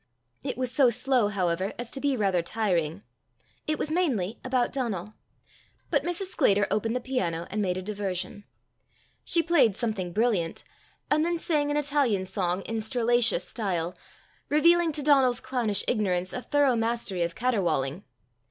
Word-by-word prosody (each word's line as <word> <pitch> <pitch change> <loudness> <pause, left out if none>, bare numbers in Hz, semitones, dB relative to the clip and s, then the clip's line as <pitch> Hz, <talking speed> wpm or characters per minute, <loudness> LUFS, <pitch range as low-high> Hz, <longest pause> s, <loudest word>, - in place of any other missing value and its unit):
It - - -4
was 255 -1 -1
so 260 -1 +5
slow, 245 -1 +2
however, 185 -1 -1
as 240 -1 -6
to 270 - -6
be 280 -2 +1
rather 195 -5 +2
tiring. 180 -3 -1 0.6
It 310 0 0
was 305 - -2
mainly 245 - 0
about 255 -1 0
Donal. 215 -7 -3 0.8
But - - +3
Mrs. 355 +2 -3
Sclater 205 - +3
opened 225 +3 0
the - - +1
piano, 180 -11 -2
and 215 - -1
made 180 -2 0
a 185 - -4
diversion. 200 -1 -4 0.8
She 335 - +1
played 275 - +3
something 215 -7 -2
brilliant, 205 -5 0 0.5
and 305 +1 +4
then 340 +1 0
sang 300 -3 0
an 290 - +1
Italian 280 -10 +1
song 185 0 -1
in 225 -1 -3
strillaceous 235 -3 +1
style, 180 -6 -2 0.5
revealing 335 +3 +4
to 290 - -1
Donal's 265 -4 +4
clownish 245 -6 0
ignorance 185 -5 0
a 250 - -3
thorough 285 -2 +2
mastery 225 -5 -1
of 170 0 -1
caterwauling. 185 - 0
225 Hz, 155 wpm, -27 LUFS, 190-270 Hz, 0.8 s, so